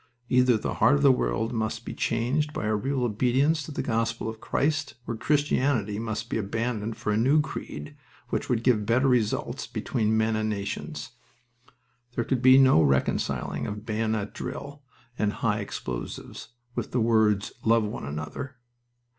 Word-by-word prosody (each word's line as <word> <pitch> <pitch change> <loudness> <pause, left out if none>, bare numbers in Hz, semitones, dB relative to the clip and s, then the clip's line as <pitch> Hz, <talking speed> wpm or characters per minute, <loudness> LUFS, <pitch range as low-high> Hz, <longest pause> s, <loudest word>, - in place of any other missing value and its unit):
Either 125 -2 +4
the - - -3
heart 115 +6 +6
of 145 - 0
the 140 - +8
world 120 -2 0
must 110 0 -2
be - - -5
changed 135 +6 0
by - - -3
a 110 0 +1
real 130 +5 -1
obedience 130 +7 +2
to 145 - -7
the - - -3
gospel 115 -1 -1
of 110 0 -6
Christ 155 0 0
or 115 - -3
Christianity 130 -6 +1
must 110 0 -3
be - - -2
abandoned 110 +1 -2
for 115 -2 -2
a 105 - +2
new 135 +7 +4
creed 75 - -5 0.3
which - - -2
would 120 -2 +1
give 110 -5 +2
better 130 +4 +3
results 125 +2 0
between 110 -3 0
men 110 0 +2
and 110 0 0
nations. 100 -1 -4 1.0
There 120 - +1
could 125 0 -1
be 130 +1 +8
no 130 -11 +6
reconciling 70 -3 0
of 105 +1 -6
bayonet 110 -2 -1
drill 145 +1 -6 0.4
and 105 -1 +1
high - - 0
explosives - - -6 0.3
with - - -3
the 125 - +2
words 110 -3 +3
"Love 115 0 +4
one 105 -9 -4
another." 75 - -5
115 Hz, 165 wpm, -27 LUFS, 110-130 Hz, 1.0 s, the